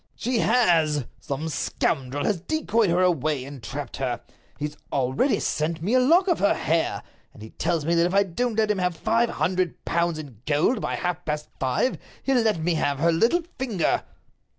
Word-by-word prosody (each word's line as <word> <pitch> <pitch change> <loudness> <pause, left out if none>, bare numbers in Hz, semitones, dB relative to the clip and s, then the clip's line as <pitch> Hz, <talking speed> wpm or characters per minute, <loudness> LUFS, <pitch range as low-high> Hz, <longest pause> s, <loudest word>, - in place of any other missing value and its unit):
"She 245 0 -1
has! 165 - +3
Some 145 +2 -4
scoundrel 140 -3 -1
has 195 -6 0
decoyed 230 - +1
her 175 +2 +3
away, 155 -6 +1
and 140 -2 -9
trapped 135 +7 -6
her. 130 -3 -2 0.4
He's 150 0 -4 0.2
already 135 - +1
sent 160 +2 -1
me 205 +7 0
a 255 - +6
lock 335 +9 +4
of 350 - +2
her 200 - +3
hair, 165 +1 0 0.3
and 105 - -11
he 110 - -10
tells 165 -2 -1
me 170 - +1
that 170 0 +4
if 180 - -4
I 200 - +6
don't 220 +5 -2
let 215 -1 +3
him 205 - -1
have 180 -2 0
five 230 +4 +2
hundred 180 -1 -1
pounds 170 -1 0
in 135 -9 -10
gold 155 - +2
by - - -2
half 180 -1 -2
past 150 -2 -3
five 130 - 0 0.2
he'll 270 -1 +2
let 220 -5 +2
me 165 +2 0
have 145 -3 0
her 165 +4 +3
little 235 - +2 0.2
finger." 225 -10 0
170 Hz, 195 wpm, -25 LUFS, 150-220 Hz, 0.4 s, a